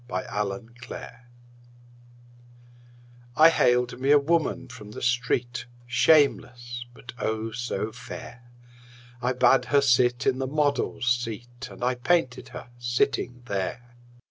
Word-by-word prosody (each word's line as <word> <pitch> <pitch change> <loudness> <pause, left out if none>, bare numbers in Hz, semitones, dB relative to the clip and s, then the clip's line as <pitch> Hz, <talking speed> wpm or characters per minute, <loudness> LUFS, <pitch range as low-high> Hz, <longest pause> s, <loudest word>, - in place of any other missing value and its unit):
My 95 - -2 0.2
Madonna 115 +5 -8 2.2
I 160 +1 +8
haled 125 -5 +2
me 135 +2 -1
a 145 - +8
woman 160 +3 0
from 105 -2 -11
the 105 - -9
street, 120 0 0 0.2
Shameless, 120 -2 +2
but, 125 +1 -12
oh, 110 +1 -2
so 120 -2 -3
fair! 120 +2 -9 0.8
I 125 +1 +1
bade 130 +1 +4
her 140 - +3
sit 125 -2 +3
in 130 0 +2
the 135 - -1
model's 145 -3 0
seat 120 0 -2
And - - -9
I 125 +1 +2
painted 130 0 0
her - - -10
sitting 120 0 -1
there. 120 +4 -4
125 Hz, 120 wpm, -26 LUFS, 120-130 Hz, 2.2 s, I